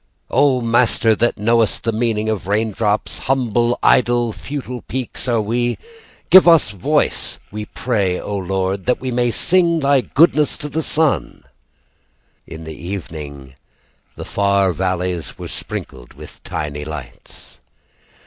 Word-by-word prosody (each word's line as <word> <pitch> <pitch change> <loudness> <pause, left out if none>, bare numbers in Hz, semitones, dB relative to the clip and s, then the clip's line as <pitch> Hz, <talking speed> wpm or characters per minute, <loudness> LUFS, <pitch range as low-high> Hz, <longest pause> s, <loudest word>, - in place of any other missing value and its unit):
"O 135 -1 +3
Master 115 -1 +3
that 120 +3 +1
knowest 115 +1 +1
the 115 - 0
meaning 110 -1 -1
of 105 -5 -2
raindrops, 105 0 -1
"Humble, 120 -2 0
idle, 120 -2 +3
futile 125 -3 -6
peaks 125 +4 -5
are 120 -2 +2
we. 120 +3 -1 0.5
"Give 185 - +10
voice 165 -9 +5
to 100 -4 -11 0.2
us, - - -5
we 105 +1 -5
pray, 100 -8 -1
O 105 - -5
Lord, 95 +1 -2
"That 125 - +2
we 130 -1 -4
may 120 0 +1
sing 170 - +2
Thy 140 -2 +3
goodness 150 +2 +3
to 150 - -6
the 160 +3 -2
sun." 155 -2 0 1.0
In 80 0 -9
the 80 0 -7
evening 75 -6 -7 0.6
The - - -8
far 100 -2 +1
valleys 90 -4 -2
were - - -7
sprinkled 60 -2 -7
with - - -13
tiny 75 0 -4
lights. 75 -6 -10
110 Hz, 140 wpm, -19 LUFS, 95-125 Hz, 1.0 s, Give